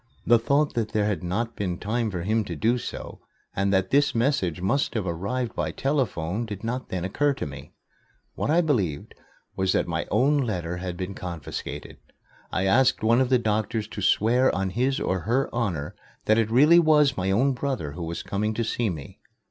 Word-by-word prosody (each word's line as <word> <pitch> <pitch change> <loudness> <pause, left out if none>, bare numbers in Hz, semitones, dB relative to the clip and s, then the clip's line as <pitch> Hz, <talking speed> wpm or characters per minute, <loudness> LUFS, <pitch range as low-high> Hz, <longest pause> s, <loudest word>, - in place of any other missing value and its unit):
The 120 0 +5
thought 140 +6 +1
that 115 -2 -2
there 105 -2 +2
had 105 -2 -1
not 110 +7 -2
been 90 -4 -2
time 110 +3 -1
for 90 -4 -4
him 110 +3 +1
to - - -5
do 120 +3 +1
so - - -7 0.4
and 100 0 +1
that 95 -1 +1
this 140 -1 +3
message 115 - +1
must 110 +10 0
have 110 -4 -1
arrived 100 +9 -2
by - - -2
telephone 115 - -1
did 105 -1 -7
not 125 +3 -3
then 90 -1 -3
occur 145 +9 +1
to - - -4
me. 70 -2 -10 0.6
What - - -3
I 165 +3 +4
believed 100 - -1 0.4
was 95 0 +1
that - - +1
my - - -2
own 145 +3 +3
letter 90 -9 -2
had 90 -1 -5
been 95 +1 -4
confiscated. 85 -6 -6 0.5
I 95 - 0
asked 120 +4 +3
one 115 +3 +4
of 130 - +1
the 130 - +5
doctors 110 -1 -1
to 105 - -6
swear 120 +7 +3
on 95 -1 -1
his 130 +5 0
honor 100 - -1 0.3
that 110 +1 +4
it 110 -1 +1
really 150 +9 +6
was 150 -4 +4
my 95 -4 -1
own 130 +8 +3
brother 125 - -3
who 85 +5 -8
was 85 0 -4
coming 105 +2 -2
to 115 - 0
see 115 0 -1
me. 75 -7 -7
110 Hz, 195 wpm, -25 LUFS, 95-125 Hz, 0.6 s, really